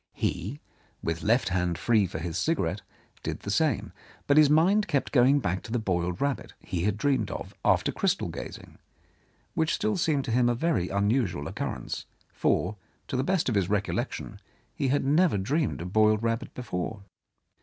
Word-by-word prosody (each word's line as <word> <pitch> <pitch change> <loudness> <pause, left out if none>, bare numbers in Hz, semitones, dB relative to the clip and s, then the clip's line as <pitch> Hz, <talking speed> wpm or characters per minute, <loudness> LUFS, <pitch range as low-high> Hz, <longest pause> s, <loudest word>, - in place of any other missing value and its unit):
He, 110 - -2 0.4
with 80 0 -2
left 115 +2 +2
hand 90 -2 0
free 110 0 +3
for 85 - -6
his 85 0 -4
cigarette, - - 0 0.4
did - - -4
the - - -4
same, - - +1 0.3
but 140 - +3
his 150 -1 +7
mind 185 +8 +4
kept 145 -5 0
going 135 +2 +5
back 95 -6 -1
to 110 - -10
the 120 - +1
boiled 90 -5 -1
rabbit 140 -2 -2
he 90 -1 -3
had 105 -1 +1
dreamed 135 +4 +1
of - - -6
after - - +3
crystal - - 0
gazing, - - -8 0.7
which 160 0 +1
still 215 -2 0
seemed 155 -5 +1
to 120 - -3
him 120 +1 +3
a 120 - +1
very 140 - 0
unusual 100 - 0
occurrence, - - -4 0.3
for, 105 +4 +1 0.3
to - - -2
the 130 - +1
best 185 +2 +1
of 125 - +1
his 100 -4 +1
recollection, 100 -1 -2 0.3
he 135 - -1
had 135 +1 +1
never 155 - +3
dreamed 130 - 0
of 90 +2 -6
boiled 110 0 +4
rabbit 115 0 -1
before. 100 -3 -4
115 Hz, 175 wpm, -28 LUFS, 95-145 Hz, 0.7 s, his